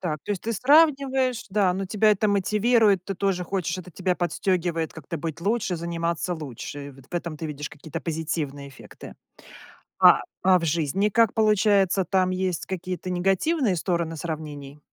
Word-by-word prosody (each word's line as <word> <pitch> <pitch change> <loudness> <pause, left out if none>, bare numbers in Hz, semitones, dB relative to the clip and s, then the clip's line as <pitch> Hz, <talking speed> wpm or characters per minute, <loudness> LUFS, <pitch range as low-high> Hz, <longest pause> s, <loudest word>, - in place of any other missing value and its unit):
Так, 155 -4 -2
то - - -1
есть 195 - -5
ты 230 - -2
сравниваешь, 270 -2 +3
да, 195 -2 +2
но 190 +1 -3
тебя 215 +2 +3
это 210 +1 +2
мотивирует. 210 0 +3
Ты 195 - -4
тоже 190 -1 -1
хочешь, 185 -1 -2
это 180 0 -9
тебя 185 +2 -1
подстегивает 175 -2 -1
как-то 160 +1 -7
быть 160 0 -5
лучше, 200 -2 0
заниматься 170 +1 -2
лучше. 145 -1 -7
Вот 135 0 -17
в - - -9
этом 170 -2 -3
ты 160 - -4
видишь 150 -1 -6
какие-то 155 +2 -7
позитивные 155 -4 -4
эффекты. 135 - -12 0.9
А, - - +7 0.2
а 185 -1 +6
в 165 - -3
жизни 170 +6 +1
как 230 0 +3
получается, 205 -3 +3
там 185 -1 +1
есть 185 -2 -2
какие-то 185 0 -5
негативные 195 - +1
стороны 170 -1 -1
сравнений? 150 -3 -6
180 Hz, 165 wpm, -25 LUFS, 160-200 Hz, 0.9 s, А